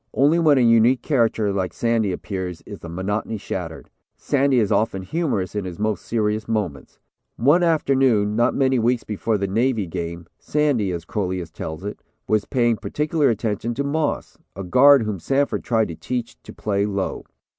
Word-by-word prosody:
Only 150 +5 +4
when 155 -4 +4
a - - +4
unique 115 +2 +4
character 115 -7 +1
like 95 -2 -2
Sandy 115 -4 0
appears 90 -2 -5
is - - -9
the 85 - -9
monotony 105 +5 -3
shattered. 90 -5 -6 0.3
Sandy 140 -2 +1
is 105 -3 +1
often 105 -3 +1
humorous 105 - -2
in 105 -1 -2
his 90 -2 -6
most 110 0 -1
serious 110 -1 -1
moments. 105 -11 -3 0.4
One 145 +9 +4
afternoon 135 -10 +2
not 120 +2 +2
many 130 -2 +2
weeks 120 +1 +1
before 110 +1 -1
the 100 - -1
Navy 110 +2 0
game 85 0 -5
Sandy, 140 -10 0
as 85 -2 -5
Crolius 90 -4 -3
tells 80 +2 -6
it, 105 - -6 0.3
was 110 -1 +1
paying 120 -4 +1
particular 150 +2 0
attention 115 0 -2
to 140 - -1
Moss, 150 +2 -2 0.2
a 95 - -5
guard 130 +8 +6
whom 105 -3 -3
Sanford 140 - 0
tried 110 -4 +1
to 85 - -6
teach 120 +6 -4
to - - -11
play 100 -1 -1
low. 100 -2 -3
110 Hz, 175 wpm, -22 LUFS, 95-130 Hz, 0.4 s, guard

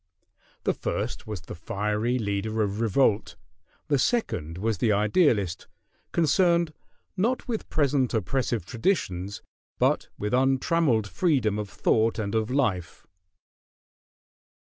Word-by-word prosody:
The - - +2
first - - -4
was 105 -5 -5
the 90 - -9
fiery 105 +6 -1
leader 110 0 -1
of 100 +1 -2
revolt, 115 -1 +2 0.5
the 145 -3 +2
second 105 - 0
was 110 0 -1
the 110 - +2
idealist, 105 - +2 0.4
concerned, 170 0 +3 0.4
not 230 +7 0
with 230 -3 -3
present 140 -4 +1
oppressive 115 0 -1
traditions, 100 - -1 0.3
but - - +1
with 105 +3 -3
untrammeled 130 -2 +2
freedom 110 - +1
of 105 -2 -4
thought 110 +4 +1
and 105 -2 -2
of 110 0 0
life. 120 -10 -1
110 Hz, 115 wpm, -26 LUFS, 100-140 Hz, 0.5 s, concerned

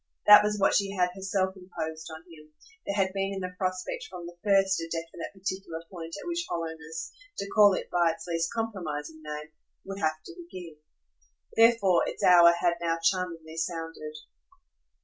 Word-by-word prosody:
That 210 0 +10
was 210 0 0
what 195 - +3
she 200 -1 +2
had 180 -2 +1
herself 190 0 -1
imposed 160 -4 -6
on 160 0 -9
him; 155 -3 -16 0.4
there 200 - -1
had 190 -2 +1
been 195 0 -1
in 190 - -4
the 180 0 -4
prospect 185 0 -3
from 180 -2 -8
the 175 0 -9
first 195 -2 +3
a 165 0 -5
definite 165 0 -5
particular 190 -4 -5
point 165 -3 -7
at - - -9
which 345 0 -1
hollowness, 160 -1 -5 0.3
to 200 - -3
call 205 -3 +7
it - - -4
by 175 -1 +3
its 165 - -5
least 170 -1 -1
compromising 160 -9 -4
name, 150 0 -7 0.3
would 195 0 -6
have 155 -2 -1
to - - -9
begin. 185 - -10 0.8
Therefore 225 -6 +5
its - - -5
hour 175 -1 +8
had 170 0 +1
now 165 -1 0
charmingly 165 -3 -1
sounded. 165 -2 -4
175 Hz, 175 wpm, -28 LUFS, 165-195 Hz, 0.8 s, That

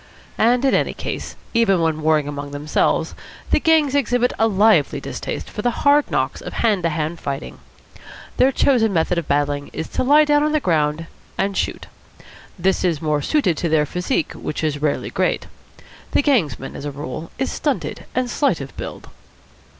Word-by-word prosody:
And, 240 +4 +3
in 270 - +3
any - - +1
case, - - -5 0.2
even 225 -6 +3
when 160 -1 0
warring 155 -2 +2
among 145 0 -5
themselves, 145 +2 0 0.4
the - - +4
gangs 310 -3 +3
exhibit 245 -3 +1
a 225 - +4
lively 205 -6 +3
distaste - - -5
for 210 - -6
the 240 +1 -1
hard 290 +1 +5
knocks - - -1
of - - -7
hand 210 -5 +1
to 170 - +1
hand 160 +1 -3
fighting. 140 +1 -5 0.8
Their 260 +1 +5
chosen 240 -6 +2
method 170 +1 +1
of 165 - -7
battling 145 0 0
is 160 - -4
to - - -1
lie 295 +4 +6
down 295 0 +3
on 300 +1 +1
the 305 - +3
ground 160 - 0 0.3
and 200 0 0
shoot. - - -2 0.7
This 190 +2 +1
is 170 -5 +1
more 150 -2 0
suited 245 - +1
to 170 - -1
their 155 -1 +3
physique, 180 +1 -2
which 150 - -5
is 145 -2 -1
rarely 150 -1 -1
great. - - 0 0.7
The - - +3
gangsman, 170 - 0
as - - -7
a - - -2
rule, 145 +3 -6
is 265 - -1
stunted 290 -3 -2
and 255 0 +1
slight 255 - +1
of 135 -1 -8
build. - - -7
180 Hz, 180 wpm, -21 LUFS, 150-250 Hz, 0.8 s, lie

